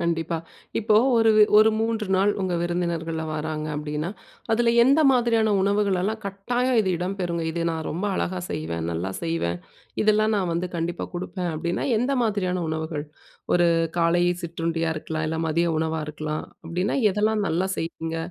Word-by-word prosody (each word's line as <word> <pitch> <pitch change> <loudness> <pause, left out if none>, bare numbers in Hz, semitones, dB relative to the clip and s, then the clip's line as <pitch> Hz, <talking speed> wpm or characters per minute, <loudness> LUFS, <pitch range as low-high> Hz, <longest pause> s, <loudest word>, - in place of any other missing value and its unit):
கண்டிப்பா, 165 -1 -1 0.4
இப்போ 215 -1 +3 0.2
ஒரு 225 -1 +5 0.3
ஒரு 220 +1 +6
3 225 -2 -1
நாள், 200 +2 +3
உங்க 185 -2 -1
விருந்தினர்கள்லாம் 165 -2 -2
வாராங்க. 155 0 -3
அப்டின்னா, 150 +3 -3 0.4
அதில 235 +1 +3
எந்த 275 +4 +5
மாதிரியான 230 -4 +2
உணவுகளெல்லாம் 200 +1 +1
கட்டாயம் 240 +5 0
இது 190 -3 0
இடம்பெறுங்க. 180 -2 -2
இது 170 0 -2
நான் 160 -1 -4
ரொம்ப 180 +6 -2
அழகா 185 0 -2
செய்வேன். 80 +1 -3
நல்லா 90 +4 -3
செய்வேன். 125 - -1 0.4
இதெல்லாம் 215 0 +3
நான் 185 -4 0
வந்து 175 +2 -1
கண்டிப்பா 170 +1 -3
குடுப்பேன். 180 0 -3
அப்டின்னா, 170 +2 -2
எந்த 255 +4 0
மாதிரியான 185 -5 -1
உணவுகள்? 160 -1 -3 0.5
ஒரு 175 -1 +4 0.3
காலை 170 +1 +3 0.2
சிற்றுண்டியா 165 -1 -2
இருக்கலாம். 155 0 -3
இல்ல 160 +1 -2
மதிய 170 +2 +1
உணவா 160 0 -1
இருக்கலாம். 155 0 -4 0.2
அப்டின்னா, 175 +7 -1 0.2
எதெல்லாம் 215 +1 +1
நல்லா 180 +4 0
செய்வீங்க? 165 0 -4
175 Hz, 145 wpm, -24 LUFS, 160-205 Hz, 0.5 s, ஒரு